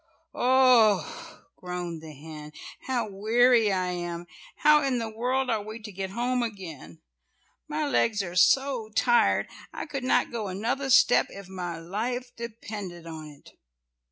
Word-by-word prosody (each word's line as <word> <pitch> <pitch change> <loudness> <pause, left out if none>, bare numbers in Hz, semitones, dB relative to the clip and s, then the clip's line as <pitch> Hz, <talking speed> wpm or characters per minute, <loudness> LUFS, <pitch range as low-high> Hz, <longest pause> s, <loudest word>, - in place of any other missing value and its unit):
oh!" 255 - +3
groaned 180 -2 -5
the 160 -1 -10
hen, 150 +1 -10 0.4
"how 245 -4 0
weary 225 +2 +3
I 185 -1 0
am. 175 -1 -4 0.3
How 300 0 +5
in 270 -3 0
the 225 -2 -3
world 255 +3 0
are 220 -2 0
we 215 +2 -8
to 210 -1 -9
get 190 0 -5
home 245 +4 -1
again. 170 - -7 0.7
My 305 0 -2
legs 225 -6 +1
are 175 -1 -7
so 260 +2 +3
tired, 240 0 +3 0.2
I - - -6
could 275 -4 -5
not 255 - +2
go 225 -3 -3
another 230 +9 -2
step 265 -1 +5
if 200 -1 -10
my 180 -3 -5
life 235 +9 -4
depended 210 -7 -7
on 160 -2 -8
it." 145 -1 -15
215 Hz, 150 wpm, -27 LUFS, 180-250 Hz, 0.7 s, How